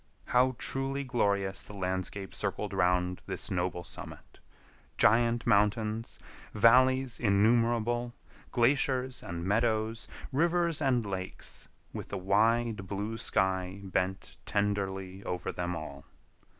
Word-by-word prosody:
How 130 +1 +3
truly 135 +1 -2
glorious 100 -6 0
the 105 - -10
landscape 95 +1 -3
circled - - -3
around 90 0 +1
this - - -2
noble 90 -1 -1
summit!—giant 115 +6 -1
mountains, 105 +2 +1 0.4
valleys 130 +3 +4
innumerable, 120 +3 +2 0.4
glaciers 130 +1 +2
and 85 0 -5
meadows, 110 +2 0 0.2
rivers 170 +2 +1
and 125 -5 +2
lakes, 95 -2 -6 0.3
with - - -6
the 100 - -4
wide 105 +2 +1
blue 105 +3 -3
sky 95 0 0
bent 95 0 -2
tenderly 95 -2 -2
over 90 - -3
them 90 0 -3
all. 70 -3 -7
105 Hz, 105 wpm, -30 LUFS, 95-120 Hz, 0.4 s, valleys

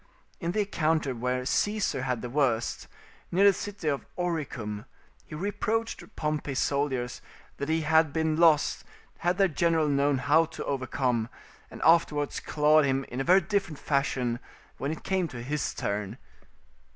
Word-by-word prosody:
In 170 -1 -2
the 215 - +2
encounter 160 -8 0
where 125 +1 -2
Caesar 205 0 0
had 125 -3 -2
the 125 - -4
worst, 125 -5 0 0.4
near 190 +3 +4
the 200 - +7
city 205 -3 -6
of 140 -2 0
Oricum, 135 - -3 0.4
he - - -8
reproached 215 +5 -2
Pompey's 150 -3 -2
soldiers 135 -4 -1 0.4
that 140 - -4
he 160 0 +2
had 160 0 +3
been 160 +1 0
lost 160 -2 +3 0.4
had 175 +1 +1
their 195 -1 +5
general 165 -1 +1
known 140 -1 +2
how 155 +5 +4
to 160 - -7
overcome; 130 -4 -1 0.4
and - - -8
afterwards 150 -3 +3
clawed 155 +1 +3
him 135 -1 +1
in 125 +2 -3
a - - 0
very 185 +5 +5
different 195 -8 -1
fashion 130 -4 0 0.4
when 140 +3 -2
it 160 - -6
came 190 -2 0
to 120 -5 -8
his 145 +3 -2
turn. 100 +2 -3
150 Hz, 155 wpm, -28 LUFS, 130-170 Hz, 0.4 s, the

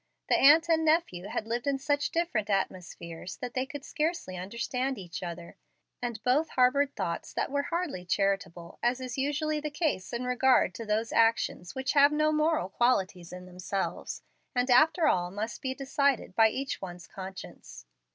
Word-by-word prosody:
The - - +5
aunt 315 +4 +6
and 325 -1 +3
nephew 310 - +1
had 215 - -3
lived 235 +3 -3
in 280 -1 +2
such 290 +1 0
different 285 -12 -1
atmospheres 180 -3 -3
that 245 -1 -6
they 260 +1 -1
could 285 0 -8
scarcely 310 - -2
understand 240 +7 -3
each 175 -3 -7
other, 170 -1 -7 0.4
and 240 -3 -4
both 285 +6 +2
harbored 270 +3 +2
thoughts 175 -4 -3
that - - -2
were 285 0 +1
hardly 330 - -3
charitable, 180 -3 -1
as 245 +2 +1
is 255 0 -5
usually 300 +2 0
the 300 0 -3
case 295 - -2
in 240 +1 -3
regard 250 +1 +3
to 230 - -7
those 220 +2 0
actions 225 -6 +1
which 265 0 -1
have 285 0 +6
no 305 +1 +2
moral 305 - +1
qualities 190 -6 0
in 180 0 -9
themselves, 185 +2 -4 0.3
and 250 +1 +1
after 315 +6 +5
all 175 -1 +2
must 210 +4 -5
be 260 0 -3
decided 275 -4 0
by 225 -1 +6
each 270 +4 -4
one's 175 -2 -8
conscience. 190 - -10
245 Hz, 170 wpm, -29 LUFS, 190-285 Hz, 0.4 s, aunt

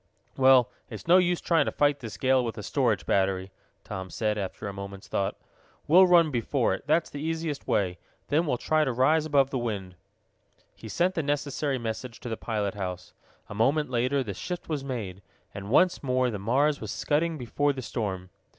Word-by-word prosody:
"Well, 130 -2 +5 0.4
no 180 +2 +7
use 180 -1 +1
trying 165 -2 +2
to - - -1
fight 145 -1 +2
this 115 -4 -8
gale 130 -1 +3
with 115 -2 -3
the 105 - -7
storage 115 -3 0
battery," 95 -1 0 0.3
Tom 95 -1 -6
said, 105 +1 -1
after 100 0 -5
a 100 - -5
moment's 100 0 -8
thought. 100 - -2 0.5
"We'll 185 +5 +7
run 170 -3 +5
before 125 +1 0
it. - - -7
That's 160 +2 +2
the 145 - -6
easiest 160 -2 -3
way. 90 -3 0 0.3
Then 155 +4 +2
we'll 125 - +1
try 155 +5 +1
to 135 - 0
rise 150 +6 +3
above 140 -2 +3
the 130 - -1
wind." 100 -6 -4 0.8
He 110 - -10
sent 180 - +1
the 165 - -1
necessary 145 -1 -1
message 115 +1 -5
to 120 - -6
the 115 - -2
pilot 105 -3 -2
house. 90 -3 -6 0.3
A - - -8
moment 135 +6 +1
later 130 +3 +1
the 105 -5 -5
shift 180 - -6
was 150 -4 -3
made, 105 -8 -5 0.3
and 100 0 -7
once 180 +9 +3
more 130 -2 +1
the 105 - -4
Mars 140 +8 +1
was 110 - -5
scudding 160 +8 0
before 145 +3 0
the 130 -2 -6
storm. 95 -6 -4
130 Hz, 195 wpm, -27 LUFS, 105-150 Hz, 0.8 s, no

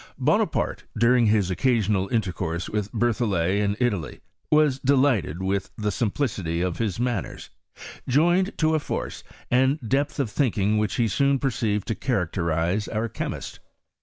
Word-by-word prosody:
Bonaparte, - - 0
during 120 +1 +4
his 105 -3 +2
occasional 105 -2 +1
inter 110 -5 0
course 85 0 -3
with 105 -1 -3
Berthollet 105 -6 +1
in 100 0 0
Italy, 105 - -1 0.3
was 150 -3 +3
delighted 130 - +2
with 95 0 -1
the 105 -1 -1
simplicity 105 - -1
of 90 -1 -2
his 110 -3 -1
manners, 120 -6 -3 0.6
joined 175 - +2
to 155 0 +2
a 155 - +2
force - - -5 0.3
and 130 +4 +3
depth 140 +5 0
of 125 -7 -1
thinking 105 -6 +1
which 105 -1 -1
he 120 -2 +2
soon 140 +6 +2
perceived 110 -6 -1
to - - 0
cha 130 +3 -2
racterize 90 +1 0
our 110 +1 -1
chemist. - - -5
110 Hz, 150 wpm, -24 LUFS, 95-130 Hz, 0.6 s, during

